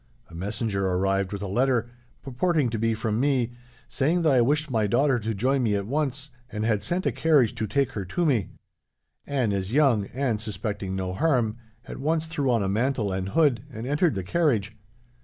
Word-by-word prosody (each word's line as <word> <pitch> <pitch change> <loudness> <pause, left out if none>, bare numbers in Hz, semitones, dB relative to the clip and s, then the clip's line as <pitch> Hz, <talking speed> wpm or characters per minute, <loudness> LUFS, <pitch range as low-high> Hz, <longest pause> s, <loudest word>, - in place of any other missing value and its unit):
A - - -14
messenger 100 +2 -2
arrived 95 +1 0
with 100 -1 -4
a - - -3
letter, 120 +2 +1 0.3
purporting 140 0 0
to 115 - -2
be 115 0 +1
from 110 0 -1
me, 130 -3 +1 0.4
saying 165 +6 +1
that 155 -4 +4
I 125 - +5
wished 150 +4 +1
my 110 -3 +1
daughter 130 +4 +2
to 110 0 -3
join 130 +6 +1
me 110 -4 +1
at 100 -1 -2
once, 140 +2 -2 0.2
and 105 0 -2
had 110 -3 +1
sent 180 +2 -2
a - - +2
carriage 145 -8 +3
to 110 -2 -3
take 140 +3 0
her 100 - -4
to 170 - -1
me. 120 - +1 0.8
Anne 130 -7 0
is 100 0 -2
young, 125 -8 +3
and, 125 -5 -2
suspecting 100 -2 -4
no 95 -1 -3
harm, 120 -4 +1 0.3
at - - -8
once 160 +3 0
threw 150 -4 -1
on 115 -4 +2
a - - -1
mantle 110 +1 0
and 95 0 -2
hood, 140 -3 +3
and 115 -1 -6
entered 150 - +1
the 95 - -3
carriage. 110 - 0
120 Hz, 200 wpm, -26 LUFS, 105-140 Hz, 0.8 s, I